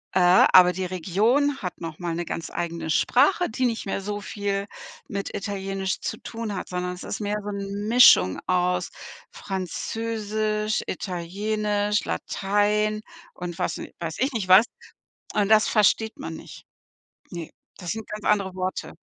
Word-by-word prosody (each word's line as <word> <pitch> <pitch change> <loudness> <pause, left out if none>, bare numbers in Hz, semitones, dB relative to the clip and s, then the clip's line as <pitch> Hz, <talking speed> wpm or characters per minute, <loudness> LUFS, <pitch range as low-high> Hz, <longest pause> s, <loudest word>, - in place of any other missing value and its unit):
Äh, 180 0 +6
aber 180 -1 +8
die 185 0 -3
Region 215 - +1
hat 180 -1 -5
noch 165 -2 -6
mal 175 -2 -3
'ne 175 +1 -2
ganz 165 0 -5
eigene 170 -1 -3
Sprache, 295 - +3
die 255 +3 -1
nicht 230 -4 -2
mehr 195 - -1
so 205 +1 -4
viel 200 0 -3 0.4
mit 200 0 -4
Italienisch 195 -1 -3
zu - - -3
tun 225 -2 -6
hat, - - -5
sondern 180 0 -3
es 180 - -9
ist - - -5
mehr 210 0 -1
so 205 - -5
'n 200 +1 -4
Mischung 230 - +6
aus 180 0 +1 0.4
Französisch, 215 +2 -2
Italienisch, 205 +3 -1
Latein 210 +2 0 0.3
und 175 -1 -6
was - - -2
n - - -6
weiß 165 -2 -4
ich 265 +2 +1
nicht 215 -5 -2
was. 190 +5 +8 0.7
Und 205 -1 +1
das 220 -1 +5
versteht 220 +1 +2
man 80 - -5
nicht. - - -12 0.6
Ne, 170 -3 -7 0.3
das 180 -3 -5
sind 220 -1 -5
ganz 210 0 -6
andere 195 -3 +1
Worte. 185 0 -4
200 Hz, 155 wpm, -25 LUFS, 180-215 Hz, 0.7 s, aber